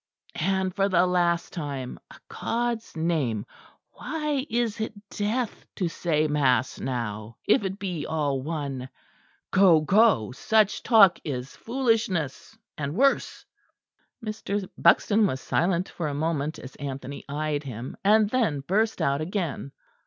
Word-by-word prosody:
And 190 Hz, +1 st, 0 dB
for 200 Hz, 0 st, +2 dB
the 180 Hz, -1 st, +4 dB
last 175 Hz, -1 st, +1 dB
time, 140 Hz, -6 st, -5 dB
a -, -, -13 dB
God's 235 Hz, -5 st, -3 dB
name, 150 Hz, -10 st, 0 dB, 0.5 s
why 300 Hz, -3 st, -3 dB
is 230 Hz, -1 st, 0 dB
it 220 Hz, -, -3 dB, 0.2 s
death 220 Hz, +3 st, -2 dB
to 180 Hz, -3 st, -1 dB
say 155 Hz, -2 st, 0 dB
mass 130 Hz, -5 st, +1 dB
now, 110 Hz, -3 st, -4 dB
if 215 Hz, +2 st, +4 dB
it 190 Hz, 0 st, -3 dB
be 180 Hz, -6 st, -4 dB
all 145 Hz, -4 st, 0 dB
one? 140 Hz, -4 st, -4 dB, 0.6 s
Go, 185 Hz, -5 st, +6 dB
go: 190 Hz, -, +4 dB
Such 215 Hz, -, +2 dB
talk 205 Hz, -7 st, +6 dB
is 130 Hz, -3 st, -5 dB
foolishness, 225 Hz, -, -1 dB, 0.2 s
and 145 Hz, +1 st, -3 dB
worse." 275 Hz, +5 st, +1 dB, 0.8 s
Mr. 205 Hz, -2 st, -3 dB
Buxton 205 Hz, +5 st, +4 dB
was 130 Hz, -, -2 dB
silent 175 Hz, +5 st, 0 dB
for 165 Hz, -, -4 dB
a 145 Hz, -, -3 dB
moment 155 Hz, 0 st, -1 dB
as 130 Hz, -, -10 dB
Anthony 140 Hz, -1 st, -6 dB
eyed 150 Hz, 0 st, -1 dB
him; 125 Hz, -3 st, -7 dB
and 210 Hz, +1 st, +5 dB
then 220 Hz, -, +1 dB
burst 215 Hz, +9 st, 0 dB
out 140 Hz, +2 st, +1 dB
again. 165 Hz, -5 st, -3 dB
170 Hz, 135 wpm, -26 LUFS, 140-210 Hz, 0.8 s, Go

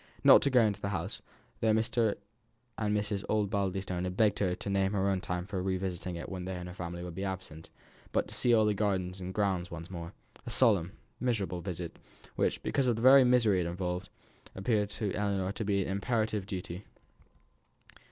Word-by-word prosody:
Not -, -, +9 dB
to 140 Hz, -, +2 dB
go 125 Hz, -2 st, +5 dB
into 105 Hz, -2 st, +1 dB
the 100 Hz, -, -2 dB
house, 100 Hz, -, -4 dB, 0.4 s
though 110 Hz, -1 st, +3 dB
Mr. 110 Hz, 0 st, +1 dB, 0.6 s
and 105 Hz, -1 st, 0 dB
Mrs. 105 Hz, -1 st, -2 dB
Osbaldistone 95 Hz, -3 st, 0 dB
had 90 Hz, +1 st, -4 dB
begged 105 Hz, -3 st, +3 dB
her 90 Hz, -3 st, +1 dB
to -, -, -8 dB
name 100 Hz, 0 st, +1 dB
her 100 Hz, -1 st, +1 dB
own 95 Hz, -2 st, +1 dB
time 90 Hz, -1 st, -3 dB
for 95 Hz, -2 st, -3 dB
revisiting 95 Hz, -1 st, -2 dB
it 85 Hz, -, -6 dB
when 95 Hz, -2 st, -5 dB
they 95 Hz, 0 st, -4 dB
and 90 Hz, 0 st, -6 dB
their 90 Hz, -, -7 dB
family 85 Hz, -1 st, -5 dB
would 90 Hz, -1 st, -6 dB
be 95 Hz, +3 st, -4 dB
absent, 95 Hz, -4 st, -6 dB, 0.4 s
but -, -, +1 dB
to -, -, -10 dB
see 120 Hz, -, +2 dB
all 110 Hz, -2 st, +5 dB
the 105 Hz, -, +3 dB
gardens 95 Hz, -3 st, -1 dB
and 90 Hz, 0 st, -5 dB
grounds 95 Hz, -3 st, 0 dB
once 85 Hz, +2 st, -8 dB
more; 85 Hz, 0 st, -6 dB, 0.3 s
a 125 Hz, -, -7 dB
solemn, 105 Hz, -7 st, +3 dB, 0.3 s
miserable 100 Hz, -8 st, -1 dB
visit, 85 Hz, -2 st, -6 dB, 0.4 s
which, -, -, 0 dB
because 135 Hz, -3 st, +1 dB
of 120 Hz, -, +3 dB
the 115 Hz, -, -4 dB
very 135 Hz, +1 st, +9 dB
misery 120 Hz, -6 st, +4 dB
it 85 Hz, -, 0 dB
involved, 90 Hz, +1 st, -3 dB, 0.5 s
appeared 105 Hz, +1 st, +1 dB
to 105 Hz, -1 st, -3 dB
Ellinor 100 Hz, -2 st, 0 dB
to 110 Hz, -, -4 dB
be 100 Hz, -1 st, +1 dB
an -, -, -5 dB
imperative 110 Hz, -1 st, -1 dB
duty. 95 Hz, -1 st, -5 dB
95 Hz, 200 wpm, -31 LUFS, 90-105 Hz, 0.6 s, Not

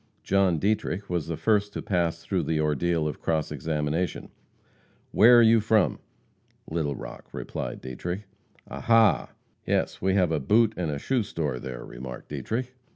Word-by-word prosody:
John 95 Hz, -3 st, +2 dB
Dietrich 100 Hz, 0 st, -1 dB
was 85 Hz, -4 st, -1 dB
the 80 Hz, -1 st, -3 dB
first 105 Hz, -2 st, +1 dB
to -, -, -4 dB
pass 85 Hz, -3 st, -1 dB
through 95 Hz, -3 st, 0 dB
the 80 Hz, 0 st, -1 dB
ordeal 75 Hz, +2 st, +1 dB
of 75 Hz, -, -5 dB
cross 80 Hz, -2 st, -1 dB
examination. 80 Hz, +3 st, -2 dB, 0.8 s
"Where 120 Hz, +3 st, +7 dB
are 120 Hz, -, +7 dB
you 115 Hz, 0 st, +6 dB
from?" 110 Hz, -2 st, +2 dB, 0.7 s
"Little 80 Hz, -3 st, -2 dB
Rock," -, -, -9 dB
replied -, -, -5 dB
Dietrich. 90 Hz, -, -5 dB, 0.4 s
"Ah, -, -, -7 dB
ha!" 115 Hz, -2 st, +4 dB, 0.4 s
"Yes, -, -, 0 dB
have 95 Hz, -2 st, +2 dB
a 80 Hz, -, +1 dB
boot 110 Hz, -, +3 dB
and 75 Hz, -5 st, -2 dB
shoe 130 Hz, -, 0 dB
store 75 Hz, -, -3 dB
there," -, -, -7 dB
remarked 60 Hz, 0 st, -9 dB
Dietrich. 125 Hz, +3 st, -3 dB
85 Hz, 155 wpm, -26 LUFS, 75-105 Hz, 0.8 s, Where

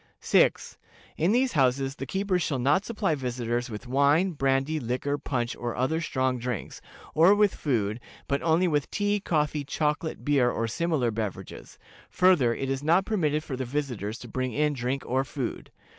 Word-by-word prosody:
"6. -, -, +2 dB, 0.4 s
In 170 Hz, +5 st, +1 dB
these 255 Hz, +3 st, +2 dB
houses 135 Hz, -, +1 dB
the 135 Hz, -, -5 dB
keepers 190 Hz, +2 st, 0 dB
shall 145 Hz, -4 st, -1 dB
not 145 Hz, +9 st, +2 dB
supply 210 Hz, -7 st, -1 dB
visitors 120 Hz, -2 st, -2 dB
with 105 Hz, +2 st, -7 dB
wine, 140 Hz, +8 st, +3 dB
brandy, 135 Hz, +1 st, 0 dB
liquor, 130 Hz, +3 st, -2 dB
punch, 120 Hz, -4 st, -2 dB
or 120 Hz, -1 st, -4 dB
other 155 Hz, +6 st, 0 dB
strong 130 Hz, -5 st, -1 dB
drinks, 125 Hz, -2 st, -5 dB, 0.3 s
or 170 Hz, +6 st, +6 dB
with 205 Hz, -1 st, +3 dB
food, 110 Hz, -6 st, -1 dB, 0.3 s
but 140 Hz, -, 0 dB
only 170 Hz, +3 st, +3 dB
with 150 Hz, -4 st, 0 dB
tea, 205 Hz, 0 st, 0 dB
coffee, 150 Hz, -5 st, 0 dB
chocolate, 150 Hz, +2 st, -2 dB
beer, 140 Hz, -4 st, +3 dB
or 115 Hz, -1 st, -1 dB
similar 145 Hz, -2 st, 0 dB
beverages; 105 Hz, -4 st, -6 dB, 0.3 s
further, 175 Hz, -10 st, +4 dB
it 135 Hz, +3 st, -3 dB
is 135 Hz, 0 st, -2 dB
not 170 Hz, +6 st, +3 dB
permitted 155 Hz, -8 st, 0 dB
for 140 Hz, -, -5 dB
the 130 Hz, -, -3 dB
visitors 120 Hz, -5 st, -3 dB
to 120 Hz, -, -10 dB
bring 130 Hz, +1 st, -3 dB
in 150 Hz, +2 st, +1 dB
drink 130 Hz, +1 st, -2 dB
or 130 Hz, +2 st, 0 dB
food. 135 Hz, -2 st, -5 dB
140 Hz, 175 wpm, -27 LUFS, 125-160 Hz, 0.4 s, or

